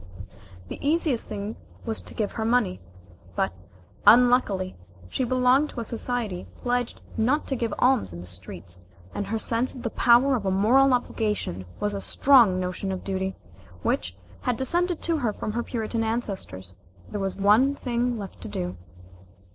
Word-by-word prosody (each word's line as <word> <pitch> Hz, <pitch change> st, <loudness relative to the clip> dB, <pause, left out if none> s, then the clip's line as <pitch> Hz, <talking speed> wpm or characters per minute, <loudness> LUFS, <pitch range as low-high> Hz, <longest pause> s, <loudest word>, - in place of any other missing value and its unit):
The -, -, -7 dB
easiest 295 Hz, -4 st, +1 dB
thing 205 Hz, +2 st, -5 dB, 0.3 s
was 225 Hz, -2 st, +2 dB
to -, -, -5 dB
give 210 Hz, -2 st, -1 dB
her 225 Hz, -, -3 dB
money. 220 Hz, -5 st, +1 dB, 0.5 s
But, -, -, 0 dB, 0.5 s
unluckily, 220 Hz, -5 st, +5 dB, 0.3 s
she 260 Hz, -, -1 dB
belonged 255 Hz, +4 st, +3 dB
to -, -, -7 dB
a -, -, -2 dB
society 230 Hz, -5 st, -3 dB, 0.2 s
pledged 245 Hz, -1 st, -1 dB, 0.2 s
not 255 Hz, +7 st, +2 dB
to 270 Hz, -, 0 dB
give 230 Hz, -3 st, -2 dB
alms 250 Hz, -, +3 dB
in 85 Hz, -, -8 dB
the 90 Hz, -, -8 dB
streets, 90 Hz, 0 st, -9 dB, 0.3 s
and 205 Hz, -, -3 dB
her 225 Hz, +2 st, -1 dB
sense 235 Hz, +4 st, -1 dB
of 250 Hz, -, -8 dB
the 230 Hz, -, -2 dB
power 250 Hz, +3 st, +5 dB
of 230 Hz, -, -2 dB
a 195 Hz, -, 0 dB
moral 250 Hz, +8 st, +4 dB
obligation 210 Hz, -, -2 dB
was 205 Hz, 0 st, -1 dB
a 200 Hz, -, -3 dB
strong 235 Hz, -10 st, +5 dB
notion 185 Hz, +1 st, -3 dB
of 185 Hz, -, -4 dB
duty, 190 Hz, 0 st, -2 dB, 0.5 s
which 85 Hz, +1 st, -1 dB, 0.2 s
had 250 Hz, -2 st, 0 dB
descended 345 Hz, +6 st, +1 dB
to 335 Hz, -1 st, +2 dB
her 240 Hz, -7 st, 0 dB
from 215 Hz, -, -4 dB
her 235 Hz, +2 st, -1 dB
Puritan 225 Hz, -1 st, -2 dB
ancestors. 195 Hz, -, -4 dB, 0.4 s
There 205 Hz, -, -3 dB
was 195 Hz, -1 st, -2 dB
one 215 Hz, +8 st, +4 dB
thing 245 Hz, -2 st, -1 dB
left 200 Hz, -3 st, -8 dB
to -, -, -6 dB
do. 90 Hz, -2 st, -4 dB
225 Hz, 170 wpm, -26 LUFS, 195-250 Hz, 0.5 s, unluckily